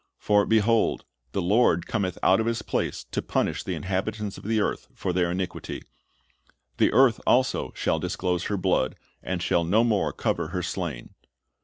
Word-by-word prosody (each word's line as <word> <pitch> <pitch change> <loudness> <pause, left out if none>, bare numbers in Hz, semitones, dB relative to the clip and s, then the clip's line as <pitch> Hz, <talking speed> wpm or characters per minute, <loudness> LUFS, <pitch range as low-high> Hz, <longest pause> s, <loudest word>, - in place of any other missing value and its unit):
For, 105 -1 +2
behold, 110 0 +2 0.3
the - - -1
Lord 95 -3 +3
cometh 95 -5 -2
out 95 - +5
of 110 - 0
His 115 -1 -1
place - - -2
to - - -1
punish - - -1
the - - -3
inhabitants 100 +2 -3
of - - -11
the 110 0 +1
earth 105 - -1
for 90 - -2
their 90 -1 +1
iniquity; 90 +1 -4 0.9
the - - +3
earth 130 -4 +4
also 130 +1 +2
shall - - 0
disclose 90 0 -2
her 100 - -1
blood, 90 -8 +1 0.3
and 90 -2 -3
shall 85 - +2
no 105 +7 +3
more 100 -10 +1
cover 75 - -1
her 90 +1 -3
slain."' 85 -9 -4
95 Hz, 170 wpm, -26 LUFS, 90-110 Hz, 0.9 s, out